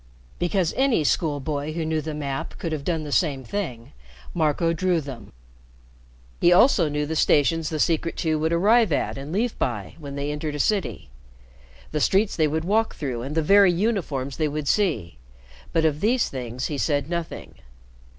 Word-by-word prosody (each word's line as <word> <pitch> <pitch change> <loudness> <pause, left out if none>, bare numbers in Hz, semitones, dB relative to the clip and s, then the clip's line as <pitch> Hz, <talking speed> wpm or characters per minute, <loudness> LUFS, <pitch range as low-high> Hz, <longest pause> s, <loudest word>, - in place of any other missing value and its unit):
Because 175 -1 0
any 265 - +2
school 150 -1 +1
boy 145 +2 -3
who 165 0 -2
knew 160 0 0
the 155 0 -5
map 140 -2 -4
could 165 - -4
have 155 -3 -3
done 165 0 -1
the 150 - -6
same 140 -5 +1
thing, 125 - -5 0.4
Marco 165 +1 +1
drew 180 0 +1
them. 135 -6 -9 1.1
He 175 - +5
also 180 - +5
knew 150 0 -1
the 160 +2 -3
stations 155 +1 +2
the 155 - -3
Secret 165 +2 0
Two 155 -2 0
would 160 +1 0
arrive 210 +4 +4
at - - 0
and 140 +2 -7
leave 220 +6 0
by 105 -7 -2
when 140 -2 -7
they 140 +1 -2
entered 150 0 -4
a - - -5
city, 145 - -1 0.8
the 150 - -1
streets 195 +6 +2
they 155 -2 +2
would 160 +2 -2
walk 220 +4 +1
through 130 -6 -4
and 140 +5 -5
the 160 - +2
very 200 +3 +6
uniforms 170 - -1
they 155 - +1
would 150 0 -4
see; 115 - 0 0.5
but 165 -1 +2
of 150 -1 +1
these 235 +4 +2
things 125 -1 -5
he 145 -3 -3
said 145 -2 0
nothing. 170 -1 -5
155 Hz, 185 wpm, -24 LUFS, 145-175 Hz, 1.1 s, very